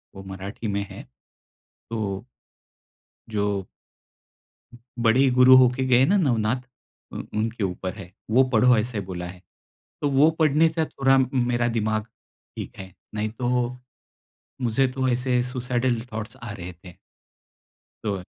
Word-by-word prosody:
वो 95 - -9
मराठी 95 +4 -6
में 100 -1 -1
है। - - -9 0.9
तो 105 -2 -3 1.0
जो 100 -3 -1 1.4
बड़े 130 +4 +5
गुरु 125 +1 +7
होके 130 0 +4
गए 125 +1 +5
ना 195 - +3
नवनाथ, 125 - +1 0.5
उन - - -6
उनके 110 0 -1
ऊपर 95 0 -3
है, 95 -4 -10 0.2
वो 130 +4 +6
पढ़ो 120 +1 +5
ऐसे 110 0 -1
बोला 90 -1 -4
है। 90 0 -11 0.6
तो 145 - +1
वो 140 +4 +5
पढ़ने 155 +1 +4
से 160 0 -1
थोड़ा 135 -2 +2 0.2
मेरा 120 -1 +1
दिमाग 110 -1 0 0.5
ठीक - - -7
है, 95 -1 -9 0.2
नहीं 105 +1 -1
तो 125 +2 -1 0.9
मुझे 125 +3 +2
तो 130 0 0
ऐसे 125 0 +1
सुसाइडल 125 -1 0
थॉट्स 110 +4 -5
आ 120 - -6
रहे 90 -2 -7
थे। 90 - -11 1.1
तो 105 -2 -1
है। 90 - -8
120 Hz, 135 wpm, -24 LUFS, 105-130 Hz, 1.4 s, गुरु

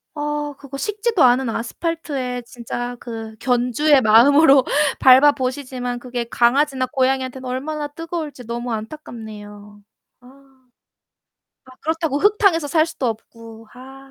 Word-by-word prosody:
아 295 0 -3
그거 275 -1 -9
식지도 420 - 0
않은 250 0 +4
아스팔트에 260 0 -4
진짜 245 +1 -6
그 225 -2 -8
견주의 255 +4 +2
마음으로 270 +5 +6 0.4
밟아 265 +3 +7
보시지만 255 -2 -4
그게 245 -1 -5
강아지나 260 +3 +1
고양이한테는 260 0 -1
얼마나 290 +4 -4
뜨거울지 310 -4 -7
너무 240 +1 -4
안타깝네요. 210 -4 -9 0.4
아. 270 +2 -20 1.1
아 260 - -16
그렇다고 320 -2 -1
흙탕에서 395 -6 +3
살 315 +2 +2
수도 310 -6 -4
없고. 225 0 -8
아. 270 +2 -13
260 Hz, 300 characters per minute, -20 LUFS, 240-295 Hz, 1.1 s, 밟아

